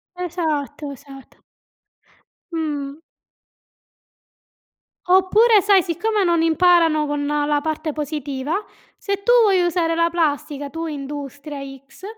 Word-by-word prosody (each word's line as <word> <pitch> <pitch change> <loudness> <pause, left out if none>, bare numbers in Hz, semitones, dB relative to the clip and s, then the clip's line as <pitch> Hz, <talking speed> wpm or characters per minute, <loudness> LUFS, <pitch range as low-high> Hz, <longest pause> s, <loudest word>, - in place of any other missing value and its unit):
Esatto, 315 -5 -3
esatto. 275 -1 -14 1.1
Mh. 295 -4 -3 2.1
Oppure, 395 +4 +5
sai, 400 -2 +4
siccome 400 +5 -1
non 340 -3 +2
imparano 330 -2 +3
con 290 0 -2
la 295 0 0
parte 310 0 -3
positiva, 295 +4 -3 0.3
se 400 -1 -4
tu 485 - +4
vuoi 390 -4 +3
usare 335 -1 0
la 335 0 +3
plastica, 290 -3 -2
tu 330 +2 -5
industria 285 0 -7 0.3
x, 275 +7 -17
320 Hz, 105 wpm, -21 LUFS, 290-360 Hz, 2.1 s, Oppure